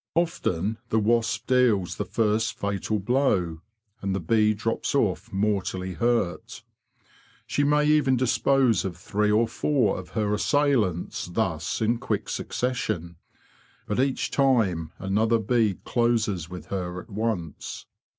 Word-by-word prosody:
Often 110 - 0
the 110 - +1
wasp 115 +1 +1
deals 125 -8 +2
the - - -2
first 110 0 0
fatal 100 +1 -1
blow, 95 - +1 0.4
and 95 -1 -1
the - - -1
bee 110 +4 +2
drops 115 +6 -2
off 105 - 0
mortally 95 -2 -1
hurt. 115 -1 -1 0.8
She 145 - 0
may 150 +1 +3
even 150 -3 +4
dispose 130 -1 +2
of 90 -3 -4
three 105 +3 0
or 110 +2 +3
four 120 -4 +1
of 90 - -10
her 105 -1 +1
assailants 110 - +1
thus 90 -3 -2
in 115 +2 +1
quick - - -2
succession. 110 -9 -2 0.7
But 105 - -2
each 135 0 0
time 105 - +2
another 110 +4 +1
bee 110 -2 +1
closes 110 -8 0
with 90 -3 -8
her 90 -2 -3
at 110 +5 -13
once. 100 -7 -3
110 Hz, 130 wpm, -26 LUFS, 95-120 Hz, 0.8 s, even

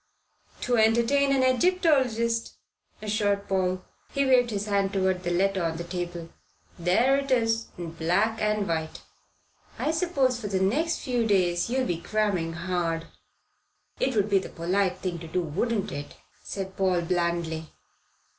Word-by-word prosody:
"To 245 -1 +1
entertain 235 +6 +3
an 270 -1 +3
Egyptologist," 255 -6 +2 0.5
assured 205 -1 0
Paul. 185 -1 0 0.3
He 275 0 +1
waved 250 -2 +4
his 205 -2 -2
hand 200 -2 +1
toward 190 -2 +1
the 175 - -2
letter 190 +1 +1
on 165 -1 -1
the 170 - -4
table. 175 -1 -5 0.5
"There 230 +11 +3
it 275 0 -5
is 225 -3 +2
in 170 -2 -5
black 180 +7 0
and 210 -1 +1
white." 160 -1 -3 0.7
"I 305 - 0
suppose 280 -7 +1
for 210 - -3
the 195 -2 0
next 290 - +1
few 245 -3 0
days 180 -2 +2
you'll 260 +1 +1
be 170 -1 -2
cramming 195 -5 0
hard." 170 -1 -2 0.9
"It 260 -2 0
would 205 -1 +2
be 200 -2 +3
the 185 - -7
polite 185 +2 0
thing 180 -2 -4
to 165 - -8
do, 180 +3 -1
wouldn't 200 +6 -1
it?" 145 -2 -6 0.3
said 190 -1 -5
Paul 185 -2 +2
blandly. 170 -2 -1
195 Hz, 155 wpm, -27 LUFS, 175-235 Hz, 0.9 s, waved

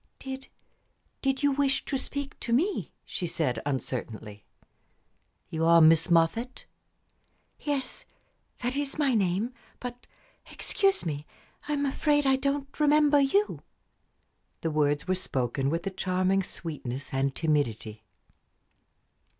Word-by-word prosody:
"Did 265 0 -7 0.7
did 270 0 0
you 285 - +4
wish 275 -1 +1
to - - -2
speak 280 +1 -3
to 235 - -3
me?" 335 - +1
she 175 - -3
said, 130 -9 -1
uncertainly. 115 -6 -4 1.1
"You 160 0 -1
are 170 +1 +7
Miss 165 +1 +6
Moffatt?" 170 +10 +2 0.9
"Yes. 280 -3 -3 0.6
That 245 +2 0
is 285 0 -2
my 285 -4 +2
name. 205 +3 +1 0.3
But, 245 0 -7 0.4
excuse 390 - +1
me. 150 -2 -4 0.4
I 300 - 0
am 285 -1 0
afraid 290 +1 +2
I 270 0 +5
don't 275 +1 -2
remember 295 -1 +5
you." 395 +10 +2 1.0
The 165 - -1
words 150 +1 +1
were 185 - +2
spoken 135 -6 -1
with 165 +3 -2
a 195 - -1
charming 185 +1 +1
sweetness 145 -8 -5
and 135 0 0
timidity. 115 -9 -1
195 Hz, 125 wpm, -28 LUFS, -, 1.1 s, are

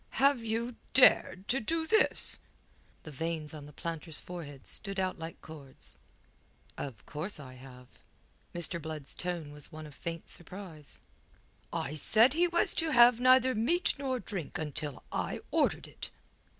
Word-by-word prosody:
"Have 275 -3 +4
you 230 +2 -2 0.2
dared 200 -6 +6
to 265 - +3
do 320 +7 0
this?" 440 +7 +3 0.6
The 155 - -9
veins 160 +1 -3
on 150 -2 -9
the - - -12
planter's 165 +1 -4
forehead 145 -7 -9
stood 195 -2 0
out 185 -2 -1
like 165 +1 -7
cords. 145 -4 -7 0.8
"Of 125 -7 -7
course 155 +5 -5
I 130 -3 -10
have." 125 -1 -13 0.6
Mr. 175 0 +3
Blood's 155 -2 -2
tone 175 -4 -4
was 145 -1 -9
one 155 0 -8
of 150 - -11
faint 165 +3 -6
surprise. 175 -4 -4 0.7
"I 135 - -3
said 225 - +6
he 345 +3 +3
was 345 0 +3
to 325 - -1
have 240 -4 +7
neither 255 0 +5
meat 285 +12 +1
nor 260 -2 -1
drink 195 -7 -5
until 150 -3 -4
I - - -2
ordered - - +1
it." - - -7
170 Hz, 150 wpm, -31 LUFS, 150-240 Hz, 0.8 s, have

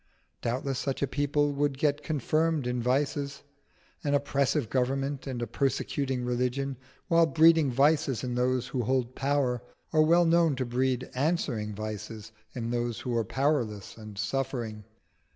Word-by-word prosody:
Doubtless 130 +2 -1
such 135 0 -2
a - - +2
people 145 +1 +1
would 140 -1 0
get 145 0 +1
confirmed 155 0 0
in 125 0 -1
vices. 140 +3 -1 0.6
An 145 -1 +2
oppressive 140 -1 +1
government 135 +3 -1
and 125 -3 -3
a - - 0
persecuting 135 +1 -1
religion, 125 +3 -1 0.3
while 165 -2 +5
breeding 160 0 +5
vices 135 -1 +2
in 125 -1 -2
those 125 0 0
who 130 - -1
hold 125 +1 0
power, 135 -3 0 0.3
are 155 - +5
well 170 +3 +5
known 165 -3 +4
to 130 0 -2
breed 125 +1 0
answering 130 -8 -1
vices 110 +1 -6 0.2
in 115 -2 -3
those 120 -1 -2
who 125 -2 -2
are 115 - +2
powerless 120 -4 -1
and 110 -2 -10
suffering. 115 -1 -3
130 Hz, 150 wpm, -28 LUFS, 120-145 Hz, 0.6 s, while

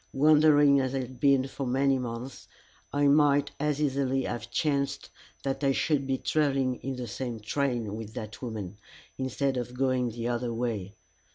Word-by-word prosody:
Wandering 145 -1 +5
as 130 0 -1
I 135 - 0
had 125 0 -9
been 135 -1 +4
for 135 0 -5
many 135 +1 +2
months, 125 +1 -6 0.4
it 145 0 +2
might 145 0 +4
as 150 0 0
easily 135 -2 0
have 120 -1 -4
chanced 140 0 -1 0.3
that 135 +1 -2
I 135 -1 +3
should 140 -1 0
be 135 -1 0
travelling 135 -5 +1
in 135 0 -5
the 125 -1 -5
same 120 +1 -5
train 115 -2 -1
with 110 0 -8
that 110 -1 -7
woman, 105 -5 -6 0.4
instead 130 +1 -1
of 125 0 -4
going 130 -2 +1
the 115 +1 -4
other 120 0 -1
way. 115 -4 -3
130 Hz, 170 wpm, -28 LUFS, 120-140 Hz, 0.4 s, Wandering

